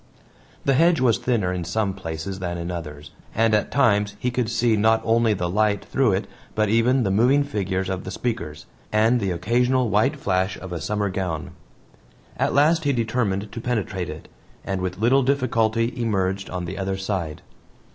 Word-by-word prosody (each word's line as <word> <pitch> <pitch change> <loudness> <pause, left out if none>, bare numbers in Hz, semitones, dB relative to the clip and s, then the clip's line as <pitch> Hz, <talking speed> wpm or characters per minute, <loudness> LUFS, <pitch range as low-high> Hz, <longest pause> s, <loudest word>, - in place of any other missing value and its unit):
The 140 - +3
hedge 165 +4 +4
was 125 -4 +3
thinner 105 -8 0
in 90 -1 -3
some 100 +3 -1
places 95 +1 -5
than 85 -1 -3
in 85 +1 -4
others, 75 -4 -7 0.2
and 115 0 +3
at 105 - +2
times 105 -6 +2
he 125 - -1
could 125 -2 -1
see 115 0 +2
not 110 +1 +3
only 115 -1 +3
the 90 -2 -2
light 105 +2 +1
through 130 -7 +2
it 95 +3 -1 0.3
but 110 -1 +2
even 120 +4 +3
the 95 - 0
moving 125 +8 +4
figures 95 -8 -2
of 95 -1 -3
the - - -6
speakers, 85 -10 -4 0.3
and 110 +3 +3
the 100 -3 -1
occasional 120 +7 +1
white 130 +9 +2
flash 95 -7 -1
of 95 0 -9
a 85 - -4
summer 105 +4 -1
gown. 90 -2 -3 0.8
At - - 0
last 160 +3 +4
he 140 -1 +2
determined 110 -4 -1
to 115 - -6
penetrate 100 -7 -2
it, 75 +1 -8 0.4
and 95 -1 -2
with 90 0 -3
little 120 +7 +3
difficulty 115 -3 +1
emerged 95 -5 -1
on 90 -1 -4
the 95 +3 -6
other 95 0 -2
side. 95 -6 -3
105 Hz, 185 wpm, -23 LUFS, 95-120 Hz, 0.8 s, hedge